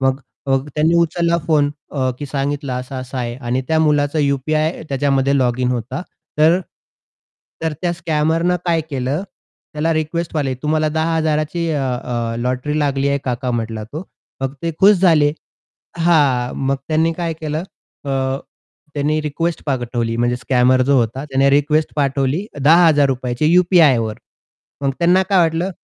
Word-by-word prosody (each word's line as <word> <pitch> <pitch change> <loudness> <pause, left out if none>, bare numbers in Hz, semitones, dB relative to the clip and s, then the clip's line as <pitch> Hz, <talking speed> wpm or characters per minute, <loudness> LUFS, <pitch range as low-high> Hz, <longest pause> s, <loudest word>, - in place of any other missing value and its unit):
मग 135 +1 +1 0.5
त्यांनी 155 +2 +2
उचलला 170 0 +1
फोन 150 -3 +3 0.2
अ, 130 -3 -1
की 145 - -5
सांगितलं 140 0 -2
असा-असा 130 +1 -5
आहे 120 -1 -3
आणि 125 0 -2
त्या 160 - +2
मुलाचा 150 -1 +2
यू-पी-आय 155 +3 0
त्याच्यामध्ये 140 0 +1
लॉगिन 125 0 +1
होता. 125 +5 -4 0.4
तर 165 +4 +5 1.0
तर 160 -1 0
त्या 175 -1 +1
स्कॅमरनं 165 +1 0
काय 165 -2 +2
केलं 135 +4 -2 0.5
त्याला 155 +2 0
रिक्वेस्ट 160 +2 -2
मारली 140 -4 0
"तुम्हाला 155 +1 +1
10,000 160 -1 0
ची 170 -1 -2
अ, 145 -2 -1 0.2
अ, 115 -2 -3
लॉटरी 125 +5 -2
लागली 140 -2 0
आहे 140 0 +1
काका" 125 0 -2
म्हटला 115 -2 -3
तो. 145 +10 -7 0.4
मग 135 0 -1
ते 165 - -1
खुश 205 +1 +7
झाले. 155 -6 +4 0.7
हां, 145 -7 +2
मग 140 +1 +1
त्यांनी 160 +1 +2
काय 170 0 -3
केलं 155 0 -3 0.4
अ, 140 - -3 0.8
त्यांनी 150 +1 0
रिक्वेस्ट 165 +3 -2
पाठवली 120 -4 -2
म्हणजे 120 +1 +1
स्कॅमर 130 0 +2
जो 140 +2 +2
होता 120 +4 -1
त्याने 135 -1 +2
रिक्वेस्ट 150 +2 +2
पाठवली 140 +5 0
₹10,000ची 145 -4 +3
यू-पी-आय 175 -7 +5
वर. 110 -1 -2 0.7
मग 140 - +1
त्यांना 175 +2 +4
काय 195 - +4
वाटलं, 165 +2 +1
145 Hz, 145 wpm, -19 LUFS, 130-160 Hz, 1.0 s, खुश